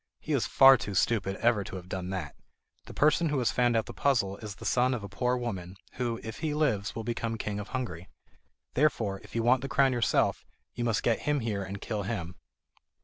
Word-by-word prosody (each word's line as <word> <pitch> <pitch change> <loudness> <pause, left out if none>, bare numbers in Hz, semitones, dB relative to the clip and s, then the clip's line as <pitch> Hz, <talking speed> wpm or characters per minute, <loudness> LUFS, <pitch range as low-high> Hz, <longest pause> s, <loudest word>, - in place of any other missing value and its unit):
"He - - -3
is - - +1
far 135 0 +8
too 100 -2 -5
stupid 95 -1 +1
ever 115 -2 +2
to 95 - -8
have 90 -1 -8
done 95 -1 -4
that! 90 -7 -4 0.5
The - - -9
person 155 +2 +3
who 145 - 0
has 125 -3 +1
found 120 -2 +2
out 110 - 0
the - - -8
puzzle 110 -9 +1
is 105 -3 -7
the - - -11
son 125 +1 +2
of 110 - -6
a - - -5
poor 125 +6 0
woman, 95 -7 -5 0.2
who, 120 -2 -2
if 110 0 -7
he 155 -2 -1
lives, 120 -10 0
will 115 - -4
become 115 0 -2
King 105 -1 -3
of 105 - -6
Hungary. 95 -10 -5 0.6
Therefore, 115 -9 +1
if - - -14
you 115 - +1
want 125 +2 +4
the 135 - -5
crown 135 -2 +3
yourself, 120 -2 +1 0.3
you 120 - -3
must 115 -2 0
get 115 -2 +2
him 145 -2 +2
here 105 -3 -2
and 100 +1 -6
kill 105 -3 -3
him." 95 -4 -4
115 Hz, 225 wpm, -29 LUFS, 100-125 Hz, 0.6 s, far